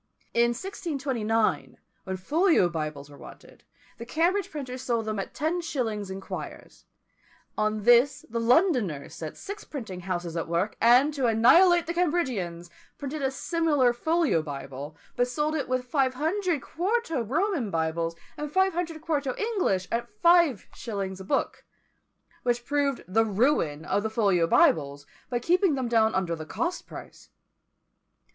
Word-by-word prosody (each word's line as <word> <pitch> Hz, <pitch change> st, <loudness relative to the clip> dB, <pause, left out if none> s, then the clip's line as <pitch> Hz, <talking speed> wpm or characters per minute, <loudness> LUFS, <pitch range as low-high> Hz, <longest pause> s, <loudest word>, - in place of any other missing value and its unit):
In 235 Hz, 0 st, +3 dB
1629, 265 Hz, -, -1 dB, 0.3 s
when 190 Hz, 0 st, -3 dB
folio 315 Hz, -, +3 dB
Bibles 155 Hz, -4 st, -4 dB
were 145 Hz, -, -14 dB
wanted, -, -, -14 dB, 0.4 s
the 235 Hz, -, -6 dB
Cambridge 350 Hz, +7 st, +1 dB
printers 260 Hz, -4 st, -6 dB
sold 235 Hz, -3 st, -1 dB
them 215 Hz, -2 st, -2 dB
at 195 Hz, -, -6 dB
ten 320 Hz, +5 st, -1 dB
shillings 225 Hz, -, -3 dB
in 190 Hz, 0 st, -5 dB
quires; -, -, -8 dB, 0.7 s
on 215 Hz, 0 st, -1 dB
this 245 Hz, +4 st, +4 dB
the 230 Hz, +1 st, -3 dB
Londoners 230 Hz, -, +2 dB
set 155 Hz, -2 st, -7 dB
six 405 Hz, +1 st, -7 dB
printing 220 Hz, -11 st, -7 dB
houses 175 Hz, -2 st, -4 dB
at 165 Hz, -, -2 dB
work, 170 Hz, +5 st, -1 dB
and, 250 Hz, +6 st, +5 dB
to 270 Hz, -4 st, 0 dB
annihilate 340 Hz, +11 st, +5 dB
the 340 Hz, -, -3 dB
Cambridgians, 250 Hz, -, -1 dB, 0.3 s
printed 285 Hz, +2 st, -5 dB
a 270 Hz, -, +1 dB
similar 290 Hz, -3 st, +1 dB
folio 315 Hz, -, +1 dB
Bible, 140 Hz, 0 st, -7 dB, 0.2 s
but 245 Hz, -, +2 dB
sold 300 Hz, +5 st, -1 dB, 0.2 s
with 255 Hz, 0 st, +1 dB
it -, -, -21 dB
five 260 Hz, -1 st, +1 dB
hundred 330 Hz, +1 st, -1 dB
quarto 355 Hz, -, -1 dB
Roman 285 Hz, -, -1 dB
Bibles, 165 Hz, -1 st, -1 dB, 0.2 s
and 300 Hz, -1 st, -5 dB
five 380 Hz, +3 st, +3 dB
hundred 330 Hz, -2 st, -4 dB
quarto 285 Hz, -5 st, -1 dB
English, 380 Hz, -, 0 dB
at 235 Hz, +1 st, -2 dB
five 340 Hz, -, +3 dB
shillings 195 Hz, -4 st, -5 dB
a -, -, -7 dB
book; 190 Hz, -, -1 dB, 0.8 s
which 240 Hz, -1 st, -1 dB
proved 285 Hz, -2 st, 0 dB
the 220 Hz, +5 st, +3 dB
ruin 205 Hz, -, +1 dB
of 205 Hz, -, 0 dB
the 220 Hz, -, -2 dB
folio 200 Hz, -7 st, +2 dB
Bibles, 145 Hz, -3 st, +3 dB, 0.2 s
by 245 Hz, -, 0 dB
keeping 350 Hz, -, +2 dB
them 260 Hz, -2 st, -2 dB
down 225 Hz, -2 st, +3 dB
under 175 Hz, -3 st, 0 dB
the 155 Hz, -1 st, -8 dB
cost 345 Hz, -, -3 dB
price. -, -, -11 dB
245 Hz, 150 wpm, -27 LUFS, 190-315 Hz, 0.8 s, and